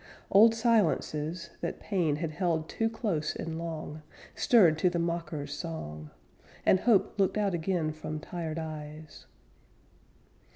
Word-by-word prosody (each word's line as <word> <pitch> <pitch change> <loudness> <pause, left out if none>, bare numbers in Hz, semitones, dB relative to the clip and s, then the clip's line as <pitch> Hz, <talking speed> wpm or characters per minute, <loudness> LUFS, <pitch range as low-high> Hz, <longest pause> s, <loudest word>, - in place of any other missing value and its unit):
Old 225 +3 +7
silences, 170 -7 +1
that 170 - -3
pain 175 -8 0
Had 155 +1 -3
held 165 -1 -1
too 225 +5 0
close 200 -9 -2
and 165 0 -4
long, 160 -2 -5 0.3
Stirred 190 -10 +5
to 180 - +4
the 175 - -2
mocker's 165 -4 -2
song, 75 - -6 0.6
And 190 - +5
hope 210 -2 +2
looked 195 +1 +2
out 205 -3 +1
again 170 -2 0
From 155 0 -5
tired 165 -1 -5
eyes. 155 -1 -7
165 Hz, 130 wpm, -29 LUFS, 155-190 Hz, 0.6 s, Old